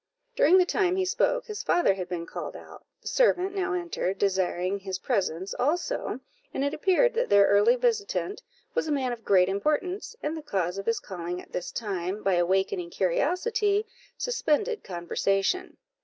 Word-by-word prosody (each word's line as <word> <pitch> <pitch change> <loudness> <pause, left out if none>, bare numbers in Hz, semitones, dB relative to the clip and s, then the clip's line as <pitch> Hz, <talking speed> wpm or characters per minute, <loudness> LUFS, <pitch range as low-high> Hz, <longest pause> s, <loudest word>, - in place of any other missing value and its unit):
During 360 +1 +6
the 365 - +5
time 365 0 +1
he 380 0 +1
spoke, - - +1
his 425 -2 -5
father 350 - +3
had 185 -2 -6
been 170 -2 -3
called - - -6
out; - - -12 0.2
the - - -8
servant 390 -6 +2
now 380 -1 -1
entered, 340 - -2
desiring 190 -1 0
his 190 -1 -4
presence 185 -4 -1
also; 345 - -1 0.3
and 270 - -2
it 285 +1 0
appeared 395 +10 +3
that 475 +2 0
their 200 0 +6
early 205 - +5
visitant 455 -3 -1 0.3
was 485 - 0
a - - -1
man 265 -3 0
of 230 -1 -9
great 185 -2 +4
importance, 305 - -1
and 300 +2 -1
the 315 - -5
cause 190 - -2
of 195 - -7
his 230 - +1
calling 180 -2 -5
at - - -13
this 175 - -4
time, 195 -2 -3
by 195 - +2
awakening 180 0 +1
curiosity, 400 - +1 0.3
suspended 450 -1 0
conversation. 195 - -1
255 Hz, 170 wpm, -27 LUFS, -, 0.3 s, During